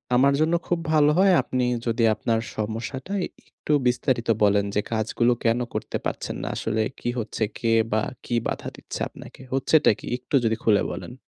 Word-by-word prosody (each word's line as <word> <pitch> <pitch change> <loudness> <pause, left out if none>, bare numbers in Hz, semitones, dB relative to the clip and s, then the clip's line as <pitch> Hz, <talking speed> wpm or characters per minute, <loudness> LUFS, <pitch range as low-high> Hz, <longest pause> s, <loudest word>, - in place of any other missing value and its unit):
আমার 140 +2 +5
জন্য 160 +2 +2
খুব 175 -1 +1
ভালো 150 -1 +5
হয় 195 0 +6
আপনি 130 -1 -1 0.2
যদি 115 0 +1
আপনার 115 -1 0 0.2
সমস্যাটা 115 - -4 0.3
একটু 150 - -3
বিস্তারিত 125 -1 0
বলেন 100 0 +4
যে 105 - +3
কাজগুলো 115 +2 +1
কেনো 120 +1 +2
করতে - - -3
পারছেন - - -3
না, - - -3
আসলে 110 0 -1 0.2
কি 120 - -2
হচ্ছে, 110 0 -3
কে 115 -1 -1 0.2
বা 110 0 +2 0.2
কি 120 - -1
বাধা - - -4
দিচ্ছে - - -8
আপনাকে? - - -13
হচ্ছেটা 145 +2 +4
কি? - - -10
একটু 130 +3 -3
যদি 110 0 +2
খুলে 105 -3 +4
বলেন। 120 - -7
120 Hz, 175 wpm, -24 LUFS, 110-135 Hz, 0.3 s, হয়